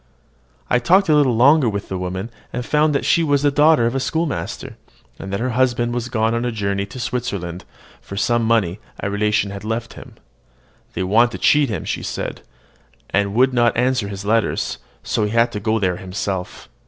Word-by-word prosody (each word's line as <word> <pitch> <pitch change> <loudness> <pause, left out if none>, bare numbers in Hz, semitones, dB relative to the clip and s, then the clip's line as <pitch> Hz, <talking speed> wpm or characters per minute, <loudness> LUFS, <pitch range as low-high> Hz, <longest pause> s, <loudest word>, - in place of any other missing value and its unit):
I 125 - +2
talked 185 +9 +3
a 155 - +5
little 135 -5 +3
longer 135 +2 +5
with 100 -1 -4
the 95 - -4
woman, 95 +5 -4 0.2
and 125 0 -4
found 150 +1 +2
that - - 0
she 170 - +3
was 145 -3 +1
the 145 - +3
daughter 150 -3 +4
of 115 - 0
the 135 - 0
schoolmaster, 160 +3 -3 0.4
and 95 - -7
that 100 - -2
her 125 +2 -1
husband 120 -1 +1
was 120 0 -3
gone 110 -2 +1
on 115 0 -1
a 120 - -1
journey 100 -3 -2
into 100 +6 -6
Switzerland 100 -8 -4 0.4
for 100 - -9
some 120 +2 +1
money 110 -5 +1 0.2
a 100 - -3
relation 105 0 +1
had 100 0 -7
left 115 +1 -3
him. - - -12 0.8
"They - - -2
wanted 115 +6 +3
to - - -4
cheat 145 -3 +3
him," 105 - -4
she - - -3
said, - - -5 0.7
"and 100 +1 0
would 130 +2 +4
not 120 -2 +2
answer 125 -3 +1
his 100 0 -7
letters; 115 +1 0 0.2
so 105 - 0
he 105 +3 -2
is 115 -1 +3
gone 110 +1 0
there 90 -2 0
himself. 95 0 -5
115 Hz, 200 wpm, -20 LUFS, 100-130 Hz, 0.8 s, a